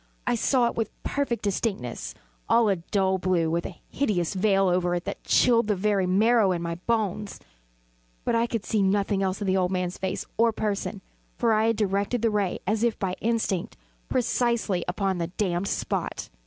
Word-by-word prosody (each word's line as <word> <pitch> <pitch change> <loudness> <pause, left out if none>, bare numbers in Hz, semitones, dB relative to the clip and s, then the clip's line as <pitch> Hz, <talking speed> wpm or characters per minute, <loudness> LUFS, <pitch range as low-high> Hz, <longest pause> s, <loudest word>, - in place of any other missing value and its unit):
I 245 - +1
saw 245 +1 +2
it 235 - 0
with 225 - -2
perfect 280 -5 -1
distinctness 195 - -2 0.3
all 230 -2 +4
a 195 - +2
dull 190 +2 0
blue, 175 -3 +1
with 170 +1 -1
a 180 - -11
hideous 200 - -1
veil 195 0 +3
over 180 0 +1
it 175 - -3
that - - -5
chilled 235 -3 +4
the 210 - +2
very 195 -1 +1
marrow 210 +2 +4
in 170 - -3
my 170 0 -2
bones; 210 -3 -1 0.9
but - - +1
I 230 +1 +2
could 230 -3 -3
see 215 - +1
nothing 195 0 +1
else 190 +1 -1
of - - -1
the 190 0 +2
old 180 -1 +2
man's 180 -1 -2
face 190 0 -3
or 230 +1 +4
person: 205 -2 -3 0.4
for 230 -2 +2
I 215 +1 +3
had 230 - +2
directed 205 +3 0
the 230 - +3
ray 205 -3 0
as 215 +3 0
if 235 -2 +1
by 185 -2 -2
instinct, 220 -5 -1 0.3
precisely 235 -6 +1
upon 190 0 -1
the 170 - -1
damned 180 0 -1
spot. - - -3
200 Hz, 190 wpm, -26 LUFS, 185-225 Hz, 0.9 s, all